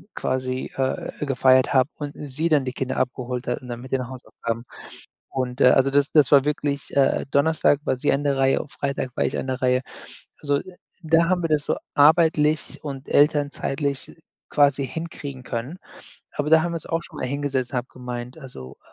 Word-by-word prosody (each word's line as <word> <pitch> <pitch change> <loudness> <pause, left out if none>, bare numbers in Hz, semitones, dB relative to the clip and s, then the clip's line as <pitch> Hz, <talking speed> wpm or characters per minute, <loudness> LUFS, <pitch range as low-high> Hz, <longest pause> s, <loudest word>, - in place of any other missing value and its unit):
quasi, 130 0 -2
äh, 135 +2 -2
gefeiert 130 -1 +4
habe 130 +1 +4
und 145 -1 -5
sie 150 +3 -3
dann 150 -3 +3
die 130 - -2
Kinder 130 0 -3
abgeholt 125 0 -2
hat, 125 - -2
und 125 - -11
dann 120 -1 -6
mit 130 - -11
den 130 -2 -1
Hausaufgaben. 115 -2 -5 0.7
Und, 130 0 -3
äh, 125 - +8
also, 135 +1 +4
das 145 0 +2
das 150 -4 +4
war 140 -2 +7
wirklich, 145 -1 -2
äh 140 -1 +3
Donnerstag 145 0 +3
war - - +1
sie - - +1
an 140 +1 0
der 140 -1 +1
Reihe, 135 0 +3
und 145 - -13
Freitag 140 -2 -3
war - - +1
ich - - -1
an - - -4
der 130 0 -3
Reihe. 125 0 +2 0.6
Also, 145 -1 +1 0.4
da 165 +1 +3
haben 180 -1 +1
wir 165 - 0
das 150 -1 +2
so - - 0 0.2
arbeitlich 155 0 +3
und 140 -3 -6
elternzeitlich 145 -1 +1 0.3
quasi 140 -2 +3
hinkriegen 145 -5 -7
können. 125 +8 -5 0.5
Aber 150 +1 -2
da 160 0 +6
haben 175 - -2
wir - - -3
uns 165 - -6
auch 165 0 -1
schon 155 - -12
mal - - -2
hingesetzt, 140 -2 -2
habe 125 0 -2
gemeint, 125 +1 -7
also, 70 - -10
140 Hz, 195 wpm, -23 LUFS, 130-150 Hz, 0.7 s, äh